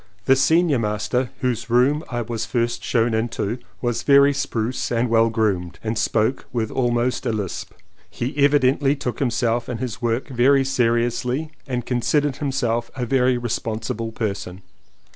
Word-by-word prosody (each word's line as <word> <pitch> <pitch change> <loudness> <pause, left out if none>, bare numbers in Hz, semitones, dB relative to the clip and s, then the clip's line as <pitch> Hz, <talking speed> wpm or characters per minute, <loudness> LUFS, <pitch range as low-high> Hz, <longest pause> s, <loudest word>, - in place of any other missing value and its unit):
The 135 - +5
senior 160 0 +3
master, 115 +4 -1
whose 125 -2 -1
room 130 +6 +3
I 120 -1 -2
first 115 -1 -4
was 120 -1 0
shown 115 0 +1
into, 115 0 -2 0.2
was 120 -2 -1
very 140 0 +5
spruce 125 -3 -2
and 120 0 +1
well 115 0 +4
groomed 100 -6 -1
and 110 +1 -2
spoke 110 +3 0
with 115 -3 -2
almost 120 0 0
a - - +1
lisp. 105 -5 -4 0.4
He 125 +3 -4
evidently 140 0 +3
took 125 -5 -4
himself 120 -2 0
and 120 -2 -4
his 125 -2 -5
work 120 +3 -1
very 135 +2 +3
seriously 125 +3 0 0.2
and 125 -3 -3
considered 135 +3 0
himself 120 -5 -1
a 125 -1 -2
very 125 0 +2
responsible 115 -1 -3
person. 100 -4 -4
120 Hz, 150 wpm, -22 LUFS, 115-130 Hz, 0.4 s, The